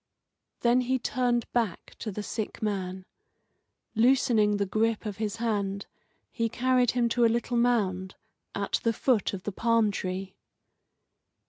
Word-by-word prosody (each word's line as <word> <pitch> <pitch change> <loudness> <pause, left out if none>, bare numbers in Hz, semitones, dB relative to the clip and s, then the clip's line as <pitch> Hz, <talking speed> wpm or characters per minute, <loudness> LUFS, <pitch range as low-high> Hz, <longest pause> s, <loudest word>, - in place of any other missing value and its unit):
Then 240 +1 +4
he 260 +1 +1
turned 245 -1 0
back 225 -7 -1
to 215 - -4
the 205 +2 -5
sick 220 +1 -4
man. 190 -3 -3 0.9
Loosening 225 -3 +3
the 200 - 0
grasp 220 +3 0
of 205 -2 -4
his 215 -1 -2
hand, 205 -4 -2 0.5
he 230 -1 -1
carried 250 +1 +2
him 245 -1 +2
to 240 +1 +2
a - - +7
little 235 +2 -1
mound 200 -6 +1 0.4
at 200 0 -1
the 230 - +1
foot 230 -4 +1
of 190 -2 -6
the 205 - -3
palm 230 +1 +2
tree. 185 0 -4
225 Hz, 145 wpm, -28 LUFS, 200-240 Hz, 0.9 s, a